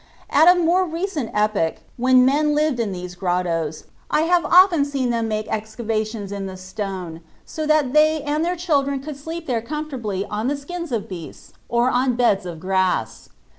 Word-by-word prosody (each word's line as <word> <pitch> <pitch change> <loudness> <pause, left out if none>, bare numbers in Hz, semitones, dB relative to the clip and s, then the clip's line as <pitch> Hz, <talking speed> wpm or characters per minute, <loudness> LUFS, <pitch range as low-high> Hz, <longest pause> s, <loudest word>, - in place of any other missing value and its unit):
At 310 +4 +5
a 360 0 +7
more 350 +2 +3
recent 330 - -3
epoch, 210 -6 +1 0.2
when 255 +1 +4
men 295 +3 +2
lived 300 -4 +1
in 220 -4 -1
these 180 -1 -6
grottos, 175 -3 -2 0.3
I - - +2
have 345 +2 +3
often 360 -4 +5
seen 275 -3 -1
them 230 -1 -1
make 215 -1 -2
excavations 220 -1 -3
in 200 -1 -4
the 190 0 -8
stone 185 -3 -6 0.2
so 310 -1 -4
that 305 -4 +2
they 310 0 +4
and 295 +2 -1
their 350 +2 0
children 280 -6 0
could 290 +2 -7
sleep 325 +4 -7
there 240 -5 -1
comfortably 240 -8 -4
on 215 +3 -3
the 285 +1 0
skins 340 +2 -6
of 225 -3 -2
beasts 175 -5 -10 0.2
or 240 +2 +2
on 250 0 +1
beds 210 -6 +2
of 170 -2 -7
grass. 185 - -1
245 Hz, 180 wpm, -22 LUFS, 200-305 Hz, 0.3 s, a